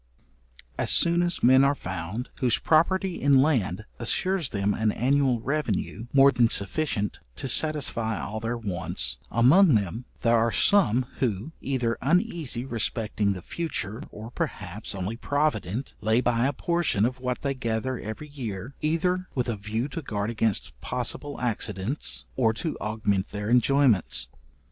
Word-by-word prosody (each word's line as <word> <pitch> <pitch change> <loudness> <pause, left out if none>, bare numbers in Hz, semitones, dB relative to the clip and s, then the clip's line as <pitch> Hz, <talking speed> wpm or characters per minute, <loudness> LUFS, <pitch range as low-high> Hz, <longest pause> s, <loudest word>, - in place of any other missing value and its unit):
As - - +1
soon 170 +1 +4
as 175 0 0
men 130 +2 +7
are 140 +1 +3
found, 95 +4 -5
whose 120 -5 +2
property 175 - +2
in 140 -1 +5
land 110 - 0
assures 185 +6 +1
them 100 -1 0
an 110 0 +1
annual 130 0 +2
revenue 120 -5 -2
more 140 0 +6
than 120 -2 +3
sufficient 105 - -1 0.2
to - - -5
satisfy 125 -7 +1
all 110 +2 -4
their 115 +2 -2
wants, 100 -7 -2
among 140 - +5
them 105 +4 -1 0.2
there 120 -1 +3
are 115 +1 +2
some, 130 - +4
who, 115 +2 -1
either 125 -4 -1
uneasy 160 - 0
respecting 110 -4 -1
the 90 -2 -8
future, 125 -9 -4
or, 110 +3 -9
perhaps, 100 -2 -4
only 95 +4 -4
provident, 130 - -1
lay 110 +2 +3
by 120 0 +2
a 140 - -1
portion 170 - +1
of 125 +1 -2
what 125 -1 -3
they 140 -1 -1
gather 125 0 -2
every 110 +8 -6
year, 120 -4 -6
either 180 +4 0
with 125 -2 0
a 120 - -1
view 110 +5 -3
to 165 - -5
guard 105 -5 -3
against 110 -3 -1
possible 145 0 -3
accidents, 115 +1 -2
or 115 -4 +2
to 160 +7 -3
augment 105 -2 -1
their 105 +2 -4
enjoyments. 125 - +3
120 Hz, 150 wpm, -26 LUFS, 110-145 Hz, 0.2 s, men